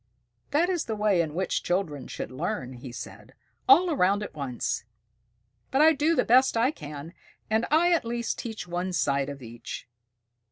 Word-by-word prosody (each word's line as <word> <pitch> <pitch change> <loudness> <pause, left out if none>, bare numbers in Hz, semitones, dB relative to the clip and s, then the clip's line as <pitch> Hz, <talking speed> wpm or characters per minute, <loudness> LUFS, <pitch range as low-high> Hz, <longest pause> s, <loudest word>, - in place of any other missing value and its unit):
"That 320 +5 +3
is 360 -3 -1
the 220 - -2
way 210 -4 +3
in 155 -2 -3
which 190 +2 0
children 165 -7 -2
should - - -6
learn," 130 0 -3
he 125 0 -9
said, 120 - -9 0.3
"all 365 -3 +7
around 200 -6 +2
at - - -7
once. 125 -6 -3 0.9
But 270 - +2
I 320 +1 +7
do 310 +3 +2
the - - +2
best 255 0 +5
I 245 +5 +3
can, 150 - -8 0.4
and 220 +2 +2
I 345 +4 +4
at 335 - +2
least 235 0 -2
teach 220 -6 -5
one 180 +1 -2
side 140 -4 +1
of 140 -2 -8
each." 115 0 -8
190 Hz, 175 wpm, -27 LUFS, -, 0.9 s, all